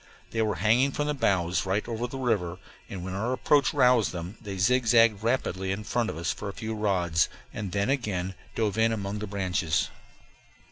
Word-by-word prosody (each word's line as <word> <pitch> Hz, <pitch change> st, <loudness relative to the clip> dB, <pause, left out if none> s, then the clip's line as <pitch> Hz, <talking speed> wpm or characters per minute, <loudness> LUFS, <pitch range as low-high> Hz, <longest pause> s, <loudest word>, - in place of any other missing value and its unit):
They 115 Hz, -, 0 dB
were 110 Hz, -1 st, +1 dB
hanging 120 Hz, +7 st, +3 dB
from 150 Hz, -, -1 dB
the 150 Hz, -, 0 dB
boughs 90 Hz, -10 st, +1 dB
right 100 Hz, +4 st, 0 dB
over 120 Hz, +1 st, -2 dB
the 135 Hz, -, -7 dB
river, 105 Hz, -9 st, 0 dB, 0.3 s
and 90 Hz, -2 st, -6 dB
when 95 Hz, -, -4 dB
our 110 Hz, +6 st, -1 dB
approach 145 Hz, +2 st, +3 dB
roused 125 Hz, -9 st, +4 dB
them 90 Hz, +3 st, -6 dB
they 100 Hz, -3 st, -6 dB
zigzagged 115 Hz, 0 st, +4 dB
rapidly 95 Hz, -5 st, -1 dB
in 100 Hz, +2 st, -3 dB
front 115 Hz, +1 st, 0 dB
of -, -, -5 dB
us 85 Hz, -, -1 dB
for 105 Hz, -, -6 dB
a -, -, -6 dB
few 110 Hz, +1 st, -4 dB
rods, 90 Hz, -6 st, +1 dB, 0.2 s
and 100 Hz, -3 st, -4 dB
then 100 Hz, +6 st, +1 dB
again 95 Hz, -8 st, -1 dB, 0.2 s
dove 110 Hz, -1 st, 0 dB
in 115 Hz, 0 st, +4 dB
among 100 Hz, -1 st, -3 dB
the 105 Hz, -, -4 dB
branches. 95 Hz, -5 st, 0 dB
105 Hz, 195 wpm, -27 LUFS, 95-115 Hz, 0.3 s, roused